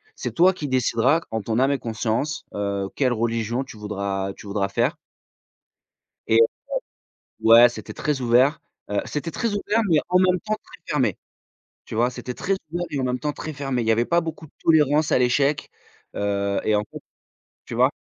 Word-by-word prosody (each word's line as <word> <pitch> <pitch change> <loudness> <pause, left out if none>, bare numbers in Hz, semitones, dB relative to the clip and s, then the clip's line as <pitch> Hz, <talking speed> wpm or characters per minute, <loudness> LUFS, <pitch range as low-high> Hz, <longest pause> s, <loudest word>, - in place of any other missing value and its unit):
C'est - - -4
toi 180 +3 +5
qui 150 -5 -5
décideras 130 +4 +2
en 110 0 -1
ton 110 +3 -1
âme 135 +2 +3
et 140 - 0
conscience, 115 +6 -2
heu, 100 -1 -2
quelle 130 -3 +2
religion 115 +2 -1
tu 115 - -12
voudras 100 -2 -3
tu - - -14
voudras 100 -1 -1
faire» 120 - 0 1.3
et - - +4 1.0
ouais, 115 +2 +8
c'était 120 - -8
très 150 -3 -2
ouvert. 125 +5 +3 0.3
Heu, 105 0 0
c'était 150 +3 -4
très 230 - -1
ouvert, 210 +2 +1
mais 160 -3 +5
en 180 - +4
même 185 -1 +3
temps 215 +2 -1
très - - -16
fermé. - - +1 0.7
Tu - - -7
vois? 120 +2 +3
C'était 125 0 -6
très 195 - -1 0.2
ouvert 175 +1 -2
et 145 - -3
en - - -1
même 125 0 -1
temps 150 +1 -2
très 155 - -6
fermé. 135 -3 -2
Il 115 - -3
y - - +5
avait 115 +2 +2
pas 170 +4 +2
beaucoup 160 -1 -6
de - - -28
tolérance 150 -1 +4
à - - +4
l'échec, 140 +4 +1 0.5
heu 100 -1 0
et 110 - +2
en 105 - +1
fait - - -8 0.7
tu - - -6
vois? - - +4
125 Hz, 195 wpm, -23 LUFS, 110-150 Hz, 1.3 s, ouais